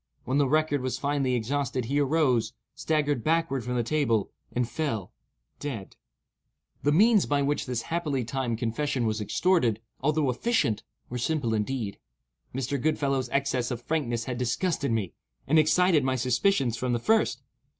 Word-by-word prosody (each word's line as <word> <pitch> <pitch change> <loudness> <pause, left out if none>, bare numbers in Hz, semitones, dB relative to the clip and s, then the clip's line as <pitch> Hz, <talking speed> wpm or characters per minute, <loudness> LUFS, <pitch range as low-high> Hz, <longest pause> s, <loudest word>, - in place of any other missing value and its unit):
When 130 +3 +1
the 140 -2 +3
record 155 -1 +2
was 130 0 -2
finally 140 -3 0
exhausted, 130 +1 -1
he 140 +5 0
arose, 130 -6 +2 0.2
staggered 145 -6 0
backward 165 -5 +1
from 125 +1 -3
the 120 - +1
table, 115 -6 +1 0.2
and 125 -1 0
fell—dead. 110 - -6 0.9
The 145 - +2
means 210 +5 +5
by 145 -1 +2
which 145 0 -1
this 125 -2 -2
happily 155 -6 -1
timed 125 -2 -2
confession 120 +2 -1
was 110 -1 -1
extorted, 120 - +2 0.2
although 150 -1 +1
efficient, 125 - 0 0.3
were 125 - -3
simple 130 -3 0
indeed. 110 -1 -2 0.5
Mr. 135 +1 -2
Goodfellow's 140 -3 0
excess 135 -3 0
of 120 -2 -4
frankness 120 -8 -1
had 125 0 -4
disgusted 140 +3 0
me, 105 -6 -1 0.3
and 155 +3 +4
excited 160 0 +4
my 130 0 +1
suspicions 125 - +1
from 125 0 -1
the 120 - +1
first. 220 - +1
135 Hz, 150 wpm, -27 LUFS, 120-150 Hz, 0.9 s, means